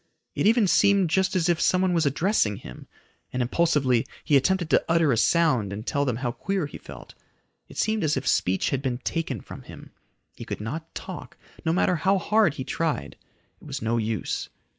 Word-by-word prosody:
It - - +1
even 225 0 +4
seemed 195 -2 +3
just 190 +2 +1
as 175 -2 +2
if 170 -2 +1
someone 185 0 +2
was 165 -3 +2
addressing 140 - +1
him, 60 -10 -11 0.4
and 125 - -3
impulsively 130 -2 +2 0.2
he 150 - +2
attempted 175 +5 +2
to - - +4
utter 165 -3 +3
a - - +3
sound 130 - +2
and 105 +3 -6
tell 140 0 0
them 125 -4 0
how 120 0 -2
queer 195 +6 -2
he 145 - -9
felt. - - -12 0.6
It - - -13
seemed 220 -3 0
as 150 -2 +1
if 130 - -3
speech 95 +1 +1
had 135 - -1
been 130 -3 -2
taken 135 - -3
from - - -10
him. - - -12 0.4
He - - -8
could - - -5
not 155 +10 -6
talk, 185 -2 -8 0.3
no 160 - +1
matter 180 0 +2
how 195 +4 +2
hard 205 -3 +2
he 130 - -4
tried. 130 - -2 0.5
It - - -13
was - - -5
no 115 +1 +1
use. 110 -3 -3
155 Hz, 200 wpm, -25 LUFS, 125-180 Hz, 0.6 s, even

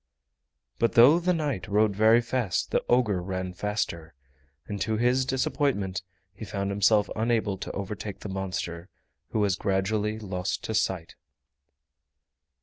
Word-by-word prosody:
But 115 - +2
though 135 +8 +7
the 180 +1 +1
knight 145 - -2
rode 105 0 +2
very 110 +3 +5
fast 120 -5 -1
the - - +1
ogre 115 -7 +3
ran 95 0 -4
faster, 85 -6 -3 0.5
and 100 +1 -5
to 110 -1 0
his 125 +3 +2
disappointment 125 -8 0 0.3
he 100 - -10
found 100 -1 -3
himself 105 +1 +3
unable 110 -3 0
to - - -5
overtake 100 0 -5
the - - -6
monster, 95 -2 -4 0.4
who 110 - 0
was 100 -3 +2
gradually 105 +3 0
lost 95 -4 -3
to 110 - -3
sight. 95 -6 -1
105 Hz, 140 wpm, -27 LUFS, 95-115 Hz, 0.5 s, though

